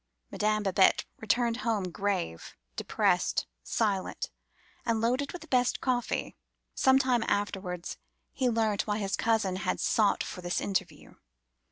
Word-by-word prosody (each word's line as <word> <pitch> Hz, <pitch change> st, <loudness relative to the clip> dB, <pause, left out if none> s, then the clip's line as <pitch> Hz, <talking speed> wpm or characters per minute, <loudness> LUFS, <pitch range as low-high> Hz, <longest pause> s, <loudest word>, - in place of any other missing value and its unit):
Madame 215 Hz, 0 st, +1 dB
Babette 190 Hz, -1 st, +4 dB
returned 230 Hz, +2 st, +1 dB
home, 215 Hz, -7 st, -1 dB
grave, 180 Hz, -, -2 dB, 0.2 s
depressed, -, -, +1 dB, 0.2 s
silent, 200 Hz, -, -1 dB, 0.5 s
and 230 Hz, -2 st, +1 dB
loaded 250 Hz, +5 st, +1 dB
with 355 Hz, -, -8 dB
the -, -, -14 dB
best 250 Hz, -3 st, +2 dB
coffee. 245 Hz, -2 st, -1 dB, 0.4 s
Some 265 Hz, 0 st, +5 dB
time 255 Hz, -3 st, +2 dB
afterwards 190 Hz, -3 st, -2 dB, 0.3 s
he 255 Hz, -2 st, +1 dB
learnt 220 Hz, -3 st, +1 dB
why 210 Hz, 0 st, 0 dB
his 200 Hz, -2 st, -1 dB
cousin 220 Hz, -5 st, +1 dB
had -, -, -1 dB
sought 210 Hz, -3 st, +2 dB
for 185 Hz, -, -7 dB
this 175 Hz, 0 st, -1 dB
interview. 195 Hz, -1 st, -3 dB
215 Hz, 135 wpm, -29 LUFS, 195-240 Hz, 0.5 s, Some